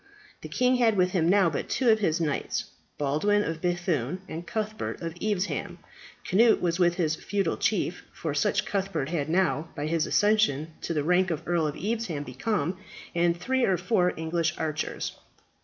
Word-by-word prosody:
The - - -8
king 250 0 +2
had 225 -4 +3
with 180 0 +3
him 170 -3 +2
now 190 -3 +4
but 145 - -3
two 255 -3 +2
of 220 -1 +5
his 170 -5 +1
knights, 150 -4 -1 0.3
Baldwin 155 +9 +2
of 165 -3 -4
B‚thune, 175 -5 0
and 170 +2 -7
Cuthbert 215 -1 -3
of 165 -1 -4
Evesham. 205 -2 -1 0.5
Cnut 225 +4 +4
was 170 0 0
with 175 -1 +4
his 165 -4 +1
feudal 200 +4 -1
chief - - -1
for - - -4
such - - +1
Cuthbert 195 -8 -2
had 155 -3 -2
now, 165 -3 +1
by 145 -1 -3
his 160 0 0
accession 205 -8 +2
to 170 - -3
the 150 - +1
rank 180 +3 +3
of 165 -1 -4
Earl 170 -2 +2
of 145 - -4
Evesham, 205 -8 -2
become 165 - -2 0.3
and 170 0 +2
three 260 +7 0
or 190 -5 +3
four 180 0 +2
English 165 +1 -1
archers. 155 -1 -3
175 Hz, 175 wpm, -27 LUFS, 160-205 Hz, 0.5 s, of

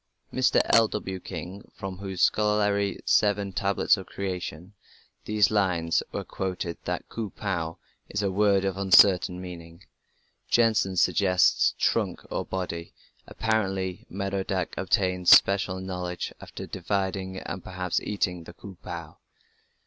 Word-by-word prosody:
Mr. 130 0 +3
L.W. 105 -4 +2
King, 90 +2 -8
from 95 -2 -6
whose 95 -2 -2
scholarly 105 -1 +2
Seven 100 -2 +2
Tablets 100 +2 +2
of 95 - -8
Creation 90 -2 -5 0.5
these 105 -1 +3
lines 90 -6 +1
are - - -4
quoted, 95 -2 -4
notes - - -38
that - - -3
"Ku 110 -3 -5
pu" 85 -5 -3 0.3
is 105 0 -2
a 100 - 0
word 100 0 +3
of 95 -1 -1
uncertain 95 -2 +5
meaning. 85 -1 -10 0.7
Jensen 110 -5 +3
suggests 90 0 +3
"trunk, - - 0 0.3
body". 85 -3 -4 0.3
Apparently 95 -5 -2
Merodach 95 -1 -2
obtained 90 -2 +1
special 95 -1 +6
knowledge 90 -1 -4
after - - -8
dividing, 95 -1 -3
and 90 0 -6
perhaps 90 -1 -2
eating, 90 -5 -2
the 85 - -11
"Ku 95 +1 -12
pu". 85 -3 -7
95 Hz, 125 wpm, -26 LUFS, 90-100 Hz, 0.7 s, special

